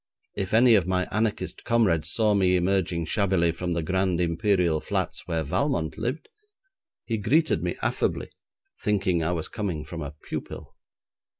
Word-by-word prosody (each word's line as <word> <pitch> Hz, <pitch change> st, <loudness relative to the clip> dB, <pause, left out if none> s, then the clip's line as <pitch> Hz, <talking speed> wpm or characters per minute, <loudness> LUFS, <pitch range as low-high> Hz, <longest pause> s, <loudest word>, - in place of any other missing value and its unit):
If 95 Hz, -2 st, -3 dB
any 120 Hz, +1 st, +6 dB
of 95 Hz, -5 st, +4 dB
my 90 Hz, 0 st, 0 dB
anarchist 110 Hz, -1 st, -2 dB
comrades 90 Hz, -10 st, +2 dB
saw 110 Hz, +4 st, +3 dB
me 95 Hz, -2 st, +3 dB
emerging 90 Hz, -2 st, +1 dB
shabbily 95 Hz, -3 st, +2 dB
from 85 Hz, +1 st, -3 dB
the 85 Hz, -1 st, -1 dB
grand 95 Hz, +1 st, 0 dB
Imperial 85 Hz, -2 st, +1 dB
Flats -, -, -3 dB
where 80 Hz, -2 st, -1 dB
Valmont 80 Hz, -, -1 dB
lived, 125 Hz, +8 st, -3 dB, 0.8 s
he 115 Hz, -, -1 dB
greeted 150 Hz, +10 st, +2 dB
me -, -, -2 dB
affably, -, -, -1 dB, 0.5 s
thinking 95 Hz, -5 st, +1 dB
I 85 Hz, +3 st, 0 dB
was 80 Hz, -2 st, -3 dB
coming 90 Hz, -8 st, -4 dB
from 80 Hz, +1 st, -7 dB
a 75 Hz, 0 st, -6 dB
pupil. -, -, -7 dB
90 Hz, 155 wpm, -26 LUFS, 85-105 Hz, 0.8 s, any